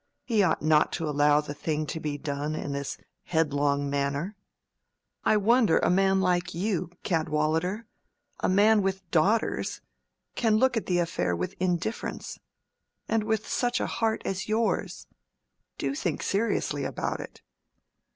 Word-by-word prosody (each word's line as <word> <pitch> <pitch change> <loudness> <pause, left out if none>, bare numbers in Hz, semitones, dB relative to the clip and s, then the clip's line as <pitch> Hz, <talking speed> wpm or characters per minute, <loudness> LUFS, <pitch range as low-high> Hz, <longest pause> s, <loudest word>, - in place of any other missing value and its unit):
He 225 -4 +2
ought 180 -6 +1
not 155 -1 +4
to 165 -2 -2
allow 145 0 +4
the 145 -1 -6
thing 155 +1 -2
to 160 - -4
be 150 -2 -3
done 145 +1 -3
in 145 - -4
this 140 0 -4 0.3
headlong 145 -3 +1
manner. 140 +7 -1 0.9
I 215 - +4
wonder 225 -2 +4
a - - +2
man 190 +1 +3
like 180 -2 0
you, 185 -1 -1
Cadwallader—a 160 +6 -2
man 210 +3 +5
with 190 -1 -2
daughters, 195 +8 +1 0.5
can 220 -3 +2
look 260 +2 +3
at 225 - -2
the 180 - +2
affair 90 - 0
with 85 - -3
indifference: 180 +4 -2 0.7
and 225 -1 +1
with 220 -1 -1
such 245 -1 0
a - - 0
heart 225 -1 -1
as 195 +2 -3
yours! 215 -3 0 0.7
Do 135 -1 -1
think 150 +2 -2
seriously 215 +4 0
about - - -3
it." - - -10
175 Hz, 140 wpm, -27 LUFS, 150-210 Hz, 0.9 s, man